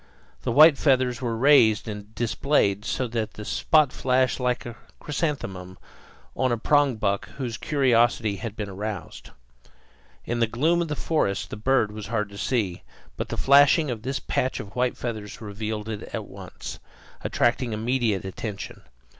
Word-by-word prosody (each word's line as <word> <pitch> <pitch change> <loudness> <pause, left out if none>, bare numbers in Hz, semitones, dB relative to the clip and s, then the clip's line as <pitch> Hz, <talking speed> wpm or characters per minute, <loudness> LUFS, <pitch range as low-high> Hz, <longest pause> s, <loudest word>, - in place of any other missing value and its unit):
The 125 - -2
white 150 +3 +7
feathers 130 -4 +2
were 115 -3 -2
raised 115 -5 +5
and 105 0 -8
displayed 110 -4 +1
so 130 - -1
that 110 -2 -3
the 105 - -8
spot 155 +2 +3
flashed 130 0 +1
like 125 -1 0
the 120 - -7 0.3
"chrysanthemum" 100 - -3 0.6
on 130 -1 +1
a 120 - +1
prongbuck 115 -7 +1
whose 125 -4 -3
curiosity 120 -7 +2
has 105 +2 -5
been 105 -1 -5
aroused. 100 -3 -6 1.0
In 120 0 -2
the 115 - +3
gloom 160 +10 +1
of 170 - -1
the 150 - -3
forest 140 -12 -1
the - - -4
bird 110 0 +1
was 105 -1 -7
hard 105 -2 -1
to 100 - -11
see, 105 -9 -1 0.3
but - - -4
the - - -4
flashing 145 +2 +5
of 115 -3 -5
this 135 +3 -3
patch 130 - -1
of 100 -1 -9
white 125 0 0
feathers 110 -4 -5
revealed 105 0 -5
it 110 -2 -4
at - - -4
once, - - -9 0.4
attracting 120 0 +1
immediate 110 -2 0
attention. 100 +2 -6
115 Hz, 160 wpm, -25 LUFS, 105-130 Hz, 1.0 s, white